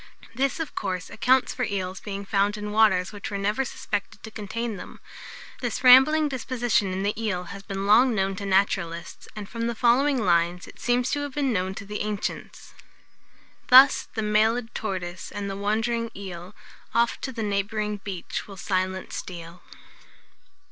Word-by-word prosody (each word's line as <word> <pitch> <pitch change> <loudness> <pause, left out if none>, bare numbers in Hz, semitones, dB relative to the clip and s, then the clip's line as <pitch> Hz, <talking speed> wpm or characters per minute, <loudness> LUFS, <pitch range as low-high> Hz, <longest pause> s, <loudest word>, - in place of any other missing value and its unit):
This, 270 +5 0
of 320 - -4
course, 185 -3 -4
accounts 260 +1 +2
for - - -6
eels 190 -4 -3
being 200 -1 -6
found 200 +1 +1
in 210 0 -5
waters 210 -4 +3
which 205 -1 -7
were 200 - -3
never 210 +6 0
suspected 205 -5 -5
to 220 - -8
contain 220 +2 -4
them. - - -10 0.6
This 245 0 -3
rambling 265 +5 +7
disposition 240 -6 0
in 190 +1 -2
the 205 +1 +1
eel 185 -5 -1
has 200 - -8
been 195 0 -5
long 230 +4 +5
known 195 -1 0
to 200 - -5
naturalists, 190 -3 0
and, 210 -2 -6
from 230 +2 -3
the 235 - -2
following 260 +5 +3
lines, 175 -3 +1
it - - -14
seems 245 +1 +1
to 290 - 0
have 285 -2 -5
been 275 -4 +1
known 190 -1 -1
to 200 - -7
the 210 +1 -5
ancients: 210 -1 -5 0.9
"Thus 260 +2 +7
the 220 - -1
mail'd 220 +3 +1
tortoise, 185 -4 -4
and 205 -1 -4
the - - -4
wand'ring; 225 +3 -1
eel, 185 -1 -8 0.4
Oft 235 0 +2
to 265 - -4
the 230 -3 -4
neighbouring 210 +1 -1
beach 195 -3 -6
will 195 -2 -10
silent 185 0 -2
steal." 170 -1 -7
210 Hz, 170 wpm, -25 LUFS, 195-235 Hz, 0.9 s, rambling